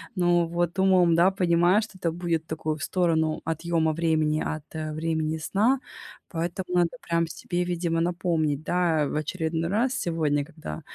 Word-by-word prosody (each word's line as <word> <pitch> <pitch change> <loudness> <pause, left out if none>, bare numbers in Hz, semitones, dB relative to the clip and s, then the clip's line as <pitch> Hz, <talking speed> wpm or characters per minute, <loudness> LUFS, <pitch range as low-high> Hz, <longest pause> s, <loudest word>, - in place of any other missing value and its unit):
Ну, 175 -2 +3
вот 175 +1 -1
умом, 185 -3 +4
да, 175 +3 +5
понимаю, 180 +2 +3
что 210 -3 -8
это 170 -3 -1
будет 165 -2 -2
такую 155 -1 -2
в 150 - -7
сторону 160 -4 +1
отъёма 165 0 0
времени 155 -2 +1
от 155 - -9 0.3
времени 160 0 -1
сна. 220 +11 +2 0.5
Поэтому 175 +2 -3
надо 175 +7 +1
прям 170 0 +2
себе, 175 +2 -3
видимо, 170 -1 -1
напомнить, 165 -4 0
да, 165 -3 +1
в - - -4
очередной 160 +1 -2
раз 240 +6 +1
сегодня, 155 - 0
когда, 150 - -8
170 Hz, 155 wpm, -26 LUFS, 160-180 Hz, 0.5 s, да